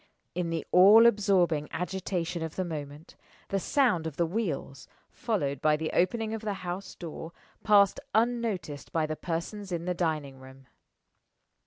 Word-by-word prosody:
In 175 -1 -2
the 165 -1 -3
all 205 +6 +8
absorbing 185 -9 +3
agitation 180 -1 -3
of 160 -1 -5
the 185 - -1
moment, 150 -1 -7 0.3
the 195 - 0
sound 205 - +1
of 155 - -7
the 170 - +2
wheels 160 - -4 0.2
(followed 145 - -2
by 155 0 +3
the 155 0 -3
opening 220 +4 +1
of 225 - -4
the 210 -2 -3
house 180 +3 -5
door) 165 -1 -8 0.3
passed 200 -2 +5 0.2
unnoticed 220 -10 -1
by 160 -1 +1
the 155 0 -3
persons 180 +5 -5
in 170 -1 -3
the 180 - 0
dining 155 -6 -2
room. 130 0 -14
175 Hz, 155 wpm, -28 LUFS, 155-200 Hz, 0.3 s, all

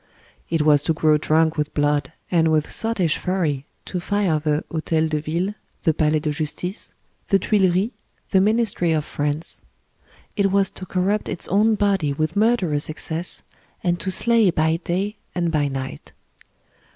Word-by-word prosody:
It 160 -2 +1
was 150 -2 +5
to 160 - +1
grow 155 -1 +3
drunk 160 +1 +2
with 150 0 -2
blood, 145 -2 +1 0.2
and 165 -2 +3
with 155 -1 +1
sottish 200 -9 +1
fury 160 -7 -1 0.2
to 180 - -3
fire 190 -4 +1
the 150 0 0
Hotel 160 0 0
de 155 -1 -1
Ville, 170 +6 -2 0.3
the 160 - +3
Palais 155 0 +2
de 150 0 -1
Justice, 165 +6 -4 0.3
the 195 - +4
Tuileries, 190 +1 +2 0.4
the 190 - +5
Ministry 210 -5 +2
of 155 -1 0
France; 145 +2 -3 0.7
it 200 -2 +2
was 195 -1 +2
to 185 - -9
corrupt 195 +4 0
its - - -3
own 215 +4 +3
body 195 -8 +1
with 155 +3 -2
murderous 200 -10 +2
excess, 160 +2 -4 0.4
and 175 -1 +1
to 195 - -3
slay 225 +1 +3
by 160 -1 +1
day 190 +5 -2 0.2
and 170 -2 0
by 150 -3 +1
night. 130 - -6
165 Hz, 160 wpm, -22 LUFS, 155-195 Hz, 0.7 s, was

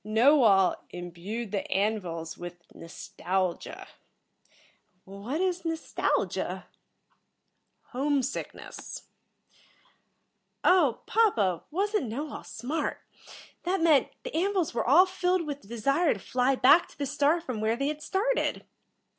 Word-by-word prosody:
"Knowall 220 -3 +5
imbued 180 +6 -6
the 200 - -3
An 210 +3 +2
vils 165 -3 -6
with 175 0 -8 0.2
nostalgia." 180 +2 -4 1.2
"What 200 - -5
is 360 -2 0
nostalgia?" 325 -1 -1 1.2
"Home 275 +1 0
sickness." 270 - -6 1.6
"Oh, 345 -10 +4
papa, 225 - +2
wasn't 395 - 0
Knowall 285 +7 -5
smart? 275 +8 -4 0.6
That 370 +2 0
meant, 315 -4 +5 0.2
the - - -6
An 385 +5 +1
vils 355 -8 0
were 230 - 0
all 330 +9 +7
filled 365 -2 0
with 290 -1 -5
the - - -18
desire 275 - +1
to - - -9
fly 250 +5 +1
back 285 +7 +6
to - - -19
the 285 - -2
star 290 +4 +2
from 255 -9 -5
where 220 +1 +1
they 275 +4 -1
had 305 0 -5
started." 445 +10 0
275 Hz, 120 wpm, -28 LUFS, 215-335 Hz, 1.6 s, all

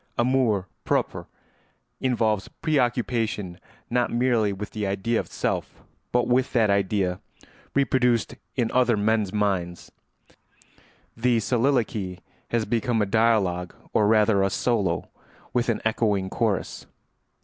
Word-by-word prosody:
Amour 120 -6 +2 0.2
propre - - -1 0.7
involves 110 -6 0
preoccupation 120 - -1 0.3
not 120 0 +1
merely 120 -3 +2
with 100 +1 -6
the 105 -2 -3
idea 105 +4 0
of - - -4
self, - - -3 0.3
but 125 0 +2
with 125 +1 +1
that 110 -5 +3
idea 95 -2 0 0.6
reproduced 125 -6 +2 0.2
in 115 -2 0
other 125 -3 +3
men's 105 -1 +1
minds; 95 -5 -1 1.2
the 120 0 +2
soliloquy 115 -5 0 0.3
has 115 -2 0
become 120 +2 0
a 105 - +2
dialogue, 100 -5 +1 0.2
or 105 - +3
rather 105 -2 +4
a 95 - +2
solo 95 -6 0 0.5
with 125 0 +1
an 115 - +1
echoing 105 -4 +1
chorus. 110 -6 -2
110 Hz, 115 wpm, -25 LUFS, 100-120 Hz, 1.2 s, rather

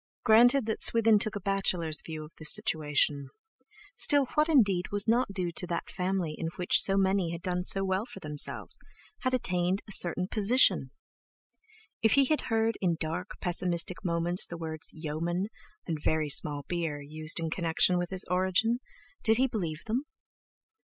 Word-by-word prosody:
Granted 245 +3 +5
that 220 - -3
Swithin 225 -2 +7
took 210 0 -2
a - - -3
bachelor's 185 -6 -1
view 155 -1 -7
of 150 - -16
the 155 - -10
situation—still 160 - 0
what 300 +2 +2
indeed 200 - +2
was 205 +1 0
not 235 -1 +1
due 180 -3 -3
to 180 +1 -3
that 170 - -4
family 180 -3 -2
in 165 - -5
which 180 - +3
so 195 0 0
many 190 -2 +1
had 170 +1 -7
done 180 -1 -2
so 195 +2 +3
well 190 +3 -1
for 240 - -10
themselves, 150 -1 +1 0.4
had 255 -1 0
attained 180 -4 -1
a - - -10
certain 180 -1 +3
position? 205 - +2 1.1
If 225 -2 +3
he 280 -1 +4
had 305 +3 0
heard 225 0 0
in 175 -3 +1
dark, 165 +4 -5
pessimistic 175 0 0
moments 170 0 0
the 170 - -8
words 160 -1 -4
"yeomen" 170 +5 -4 0.4
and 160 -3 -4
"very 155 -1 0
small 145 0 -1
beer" 165 -4 -3
used 155 +3 -2
in 165 -1 -4
connection 170 +1 +1
with 175 -1 -3
his 190 -1 -3
origin, 190 +6 +1 0.4
did 220 -1 +2
he 260 - +3
believe 175 -10 -4
them? 245 +6 -2
180 Hz, 165 wpm, -28 LUFS, 165-220 Hz, 1.1 s, Swithin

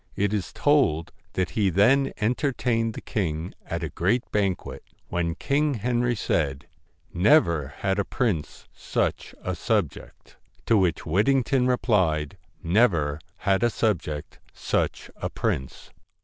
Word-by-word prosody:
It 100 +1 0
is 105 -4 -2
told 110 - +2 0.2
that 95 0 -1
he 105 -3 +2
then 125 +10 +4
entertained 120 -1 0
the - - -6
king 85 -6 -3
at - - -4
a - - -2
great 105 +8 +1
banquet, 100 -3 -1 0.3
when 85 -1 -1
King 145 0 +1
Henry 120 +2 0
said: 75 -9 -1 0.5
'Never 85 - +3
had 95 0 0
a - - +2
prince 100 - -2
such - - -2
a 95 - -2
subject.' 95 - -3 0.3
To 115 - +3
which 90 -6 +2
Whitting 110 - +3
ton 130 -1 +1
replied: 95 - +1 0.2
' - - -36 0.2
Never 75 -11 +2 0.2
had 95 0 +1
a 120 - +3
subject 90 -11 -2 0.2
such - - -2
a - - -3
prince.' 65 - -3
100 Hz, 135 wpm, -25 LUFS, 85-120 Hz, 0.5 s, then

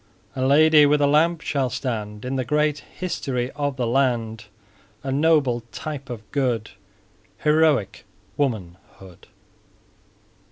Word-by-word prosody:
A 130 - -2
Lady 150 +2 +6
with 150 +1 +3
a 145 - +3
Lamp 160 +3 +3
shall 135 -5 -1
stand 110 -4 -4
In 130 +1 -3
the 130 - 0
great 150 +3 +1
history 135 -8 -4
of 145 -1 -3
the 125 -2 -1
land, 115 -3 0 0.6
A 135 - -3
noble 140 -4 +2
type 145 -4 -6
of 115 -3 -6
good, 125 -6 -1 0.7
Heroic 150 -10 +2 0.3
womanhood. 95 - -5
135 Hz, 120 wpm, -23 LUFS, 120-150 Hz, 0.7 s, Lady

